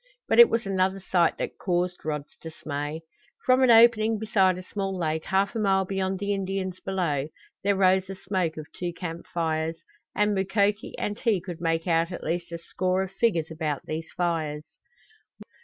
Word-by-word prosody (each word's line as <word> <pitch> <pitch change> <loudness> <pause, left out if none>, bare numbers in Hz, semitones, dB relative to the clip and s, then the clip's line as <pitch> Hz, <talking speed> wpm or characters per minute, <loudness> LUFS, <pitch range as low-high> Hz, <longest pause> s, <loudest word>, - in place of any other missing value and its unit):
But - - +3
it 475 - +10
was 230 -1 0
another 190 0 0
sight 180 -2 +2
that - - -5
caused 180 -1 -1
Rod's 150 -1 -4
dismay. 150 -1 -5 0.4
From 255 +1 +4
an 260 - +5
opening 225 -1 +6
beside 195 -4 +2
a 185 - -7
small 195 0 -3
lake 160 -2 -2
half 195 +1 +1
a 230 - -2
mile 195 -2 +2
beyond 190 0 -1
the 200 +1 -1
Indians 190 -1 -3
below 170 -8 -1 0.4
there 200 0 +2
rose 190 0 +3
the 195 - -6
smoke 185 -4 -2
of 155 - -6
two 175 -1 -4
camp 170 -1 -6
fires, 160 -1 -1 0.4
and 210 0 +2
Mukoki 200 +2 0
and 205 0 -3
he 225 -6 +2
could 175 -2 -8
make 165 -1 0
out 165 0 +1
at 175 - -6
least 170 +1 -3
a 170 - -4
score 185 +2 -1
of 190 - -7
figures 190 -6 0
about 155 -3 -3
these 160 +1 -5
fires. 160 -4 -1
185 Hz, 180 wpm, -26 LUFS, 165-195 Hz, 0.4 s, it